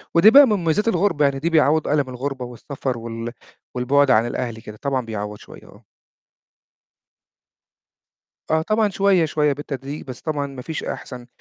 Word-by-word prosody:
ودي 170 +6 +8
بقى 285 +3 +9
من 215 - +2
مميزات 180 +3 0
الغُربة، 180 -7 +2
يعني 140 -1 0
دي 165 - 0
بيعوّض 155 -1 +3
أَلَم 145 -3 +1
الغُربة 130 0 -4
والسَفَر 125 +1 -5
وال 115 0 -6 0.4
والبُعد 135 +2 +3
عن 115 -2 +4
الأهل 115 -2 -4
كده، 105 -1 -10
طبعًا 135 -3 -1
بيعوّض 105 -2 -5
شوية، - - -14
آه. - - -18 2.7
آه 160 0 +2
طبعًا، 215 +4 +1
شوية، 195 -3 +3
شوية 150 -2 +1
بالتدريج، 140 0 -6
بس 130 -2 -9
طبعًا 145 -3 -2
ما 135 -2 -9
فيش 160 +4 -5
أحسن 125 -2 -7
140 Hz, 160 wpm, -21 LUFS, 125-160 Hz, 2.7 s, بقى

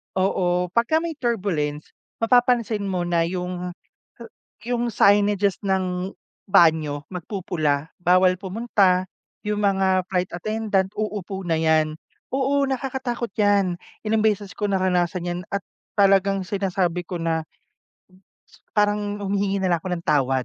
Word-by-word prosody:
Oo, 180 -1 +1
pagka 240 +7 +3
may 335 -2 -3
turbulence, 185 - -2 0.3
mapapansin 235 -3 +3
mo 185 -2 -1
na 170 -1 +2
'yung 180 0 -4 0.9
'yung 240 0 0
signages 205 -1 +3
ng 185 -1 -1 0.4
banyo, 160 -6 +3
magpupula, 165 -5 -2
bawal 185 +1 +4
pumunta, 190 -2 +1 0.4
'yung 210 0 -1
mga 190 -2 +2
flight 180 -1 0
attendant, 205 0 0
uupo 205 -2 -4
na 165 - +2
'yan. 155 -1 +2 0.4
Oo, 275 +1 +2
nakakatakot 260 -3 -3
'yan. 200 -3 +3 0.3
Ilang 220 0 +2
beses 205 -2 0
ko 210 - -2
naranasan 180 -2 0
'yan 175 0 -2
at 200 - -1 0.4
talagang 195 -1 +4
sinasabi 185 -3 -1
ko 180 - -5
na 165 -1 0 1.3
parang 205 0 +1
humihingi 200 0 0
na 185 -2 +1
lang - - 0
ako - - -5
ng 170 -1 -7
tawad, 135 -3 +2
190 Hz, 125 wpm, -23 LUFS, 180-210 Hz, 1.3 s, bawal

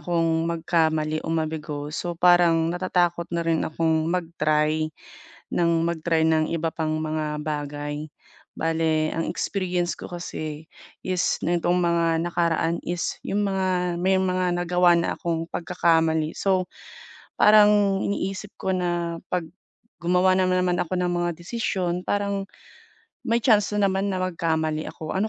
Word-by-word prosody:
akong 165 0 0
magkamali 160 -2 0
o - - -5
mabigo. 155 -2 -3
So, 175 +2 -3
parang 170 -2 +4
natatakot 175 -1 0
na 170 - 0
rin 165 -1 +1
akong 160 0 0
mag-try 155 -3 0 0.7
ng 170 -1 +2 0.2
mag-try 165 -1 0
ng 160 0 +2
iba 165 -1 -1
pang 155 -1 -1
mga 155 -1 -2
bagay. 145 0 -4 0.5
Bale, 160 -1 +1
ang 165 - -1
experience 180 -3 -1
ko - - -9
kasi 155 -3 -6 0.4
is 185 -2 0
nitong 175 +1 +1
mga 170 -2 +2
nakaraan 170 -1 0
is 175 0 -3
yung 205 +1 0
mga 185 -2 0
may 190 +1 +3
mga 185 -1 0
nagawa 175 0 +3
na - - -1
akong 165 -2 -2
pagkakamali. 165 -2 +1
So, 190 -2 +1 0.7
parang 205 -2 +5
iniisip 200 0 -3
ko 190 - -1
na 175 -2 -2
'pag 180 -2 0 0.6
gumawa 180 +2 +3
na 185 -1 +2
naman 180 -1 +1
ako 180 +1 -2
ng 180 - +1
mga 175 0 0
desisyon, 180 -2 -2
parang 200 -1 -1 0.8
may 230 +1 +2
chance 210 -4 +4
na 205 -1 +3
naman 195 +1 -1
na 185 - -2
magkamali 160 -3 -1
ako. 155 -1 -7
Ano 200 +3 0
170 Hz, 140 wpm, -24 LUFS, 160-180 Hz, 0.8 s, parang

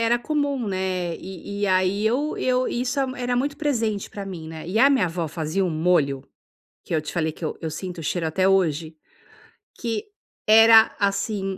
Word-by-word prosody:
era 235 +1 +3
comum, 285 -3 -1
né. 185 -3 -2
E 190 +2 -8
e - - +2
aí 185 +2 +1
eu 270 +7 0
eu 255 0 +1
isso 250 +3 -2 0.2
era 245 0 -1
muito 285 +3 -1
presente 230 -9 -1
para 200 -1 -7
mim, 170 -5 -7
né. 160 0 -8
E 190 +5 -1
a 275 +4 +6
minha 265 -9 +3
avó 170 -1 -3
fazia 160 +4 -2
um 180 - -1
molho, 155 -4 +1 0.6
que - - -6
eu 155 - +1
te 150 - -7
falei, 160 -2 0
que 160 - -12
eu - - -4
eu 160 - -3
sinto 180 +1 -6
o - - -7
cheiro 165 +2 -1
até 185 +4 +1
hoje. 165 -4 +1 0.8
Que 230 - -2 0.4
era, 225 +1 +7
assim, 200 -1 -1
195 Hz, 190 wpm, -23 LUFS, 170-230 Hz, 0.8 s, era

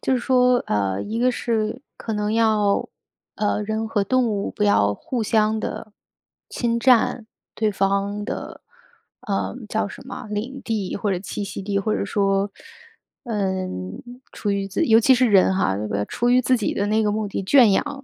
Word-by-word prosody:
就 265 - +1
是 255 - +1
说， 250 0 +3
呃， 100 -2 0
一 220 +2 -4
个 250 +1 +3
是 220 -3 -2 0.2
可 225 - -5
能 210 0 -1
要 215 -3 +2 0.5
呃， 210 0 0
人 220 +1 -2
和 210 -2 0
动 255 +4 +2
物 205 -2 -2
不 210 - -1
要 100 - +3
互 240 - -4
相 215 0 +1
地 215 0 -6 0.6
侵 235 -1 -1
占 240 -2 +3 0.3
对 220 -1 +1
方 200 +1 -1
的， - - -6 0.6
呃， 200 -6 -2
叫 215 -1 -1
什 195 - -10
么， 260 - -7
领 230 +6 -4
地 215 -5 -2
或 200 0 -1
者 180 - -1
栖 200 +2 -5
息 195 - -6
地 200 0 -1
或 215 +2 0
者 - - -1
说， 195 0 0 0.7
嗯， 190 - -3 0.3
出 205 - -3
于 200 -1 -1
自 195 0 -1
尤 225 -1 +6
其 260 +3 +5
是 255 0 +3
人 190 -1 +5
哈， 185 - +1 0.3
出 240 +1 0
于 250 - +5
自 255 +1 +3
己 215 - -2
的 200 - 0
那 215 +1 +2
个 210 - +1
目 215 -1 -2
的， 195 - -4
圈 240 +2 +6
养 275 +7 -1
210 Hz, 195 characters per minute, -22 LUFS, 200-230 Hz, 0.7 s, 尤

